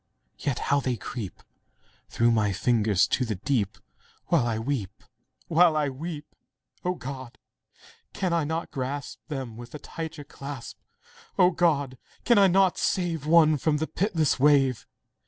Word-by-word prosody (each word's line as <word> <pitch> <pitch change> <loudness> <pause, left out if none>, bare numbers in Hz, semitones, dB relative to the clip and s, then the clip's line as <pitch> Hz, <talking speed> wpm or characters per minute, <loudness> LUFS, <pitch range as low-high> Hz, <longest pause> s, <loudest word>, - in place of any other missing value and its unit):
yet 140 -4 -1
how 145 - +1
they 130 -2 -1
creep 105 -1 -7 0.7
Through 120 0 +2
my 110 -3 +2
fingers 110 -2 +2
to 130 - +1
the 110 -4 -2
deep, 100 0 -1 0.5
While 150 -9 +3
I 115 -2 -1
weep—while 145 - -1
I 150 -2 +1
weep! 150 +2 -6 0.6
O 180 0 0
God! 130 -4 -8 0.7
can 185 -3 -1
I 165 -2 +2
not 160 +3 -3
grasp 135 +1 -4
Them 130 -7 -5
with 120 +3 -10
a - - -4
tighter 160 +1 -7
clasp? 140 -2 -8 0.6
O 180 0 +6
God! 145 -7 +1 0.3
can 235 -4 +5
I 195 - +7
not 190 0 +3
save 165 -5 -1
One 155 -2 +6
from 150 +2 +1
the 155 - -1
pitiless 165 -7 0
wave? 135 -3 +3
145 Hz, 145 wpm, -26 LUFS, 125-165 Hz, 0.7 s, I